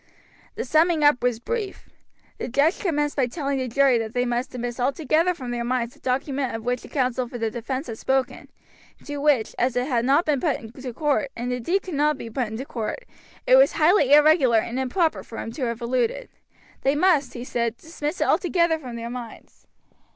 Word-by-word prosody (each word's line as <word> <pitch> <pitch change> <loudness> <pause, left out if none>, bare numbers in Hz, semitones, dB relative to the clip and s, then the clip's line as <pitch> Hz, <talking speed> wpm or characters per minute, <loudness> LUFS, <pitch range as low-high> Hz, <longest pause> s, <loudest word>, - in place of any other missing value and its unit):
The - - -3
summing 315 +3 +3
up 290 -3 +5
was 245 -2 0
brief. 415 - -4 0.5
The - - -3
judge 285 - +2
commenced 295 -6 -1
by 265 -3 +1
telling 275 0 -2
the 255 - -2
jury 260 0 +3
that 225 +1 -5
they 245 0 +1
must 245 +1 -1
dismiss 245 0 -5
altogether 310 +7 +1
from 250 -6 -6
their 240 -1 -2
minds 240 -1 -1
the - - -22
document 265 0 -1
of 225 - -6
which 245 0 -1
the - - -11
counsel 255 -2 -1
for 240 - -7
the 225 -1 -2
defense 260 +5 -4
had 225 -2 -7
spoken, 265 -1 -1 0.5
and - - -22
to 290 0 -4
which, 285 -6 +2
as 250 0 +1
it 245 0 +1
had 240 -5 +1
not 280 +7 +3
been 290 -4 +1
put 305 -6 +1
into 250 +3 -8
court, 285 +1 0
and 245 +1 -3
indeed 340 +11 -1
could 365 - -7
not 295 0 +2
be 230 - -8
put 245 +1 -1
into 220 +5 -6
court, 240 - -5 0.4
it - - +6
was - - +5
highly 310 -3 +4
irregular 295 -5 +6
and 235 +3 -1
improper 315 +6 0
for 225 - -10
him 225 - -5
to 255 +2 -3
have 235 +1 -4
alluded. 250 - -1 0.5
They 275 +2 +2
must, 310 -4 +2
he 240 - -5
said, 235 -2 -2
dismiss 315 0 -5
it - - +2
altogether 340 -3 +2
from 250 -5 -8
their 235 0 -5
minds. 240 -2 -10
260 Hz, 210 wpm, -24 LUFS, 240-300 Hz, 0.5 s, it